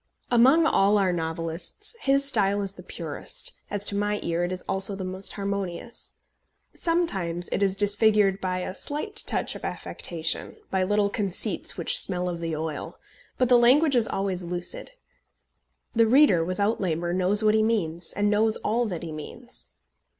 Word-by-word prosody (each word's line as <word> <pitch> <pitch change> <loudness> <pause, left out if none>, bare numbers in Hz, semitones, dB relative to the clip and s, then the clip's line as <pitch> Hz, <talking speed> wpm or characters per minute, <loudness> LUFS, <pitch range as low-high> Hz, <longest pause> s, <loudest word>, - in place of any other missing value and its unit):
Among 265 +7 +5
all 205 -8 +3
our 190 -3 +2
novelists 165 - -2
his 275 -3 +2
style 205 -5 +2
is 195 -1 -4
the - - -12
purest, - - -4 0.2
as 205 0 -3
to 200 - +2
my 205 0 -1
ear 170 +1 -1
it 175 - -2
is 185 0 -5
also 195 +1 0
the 195 - -6
most 185 +1 -4
harmonious. 200 +2 -5 0.6
Sometimes 190 - -1
it - - -1
is 195 -1 +2
disfigured 205 -1 +3
by 185 -1 -2
a 185 - -5
slight 300 - -5
touch - - +2
of - - -10
affectation, 165 -1 -2 0.2
by 190 - +1
little 205 +1 +1
conceits 200 -4 0
which - - +4
smell 180 - 0
of 175 -1 -4
the 165 -1 -3
oil; 155 -1 -5 0.4
but 255 - +2
the 245 0 +5
language 275 +5 +4
is 230 -3 +3
always 195 -2 -2
lucid. 180 - -3 1.1
The 230 0 +4
reader, 245 - +5
without 200 +6 -1
labour, 175 -1 -1
knows 190 +4 +2
what 215 0 +4
he 220 - +3
means, 175 -7 0
and 205 0 0
knows 215 +1 +2
all 235 +2 -1
that 175 -5 -5
he 165 - -6
means. 235 +11 -7
200 Hz, 170 wpm, -25 LUFS, 180-225 Hz, 1.1 s, Among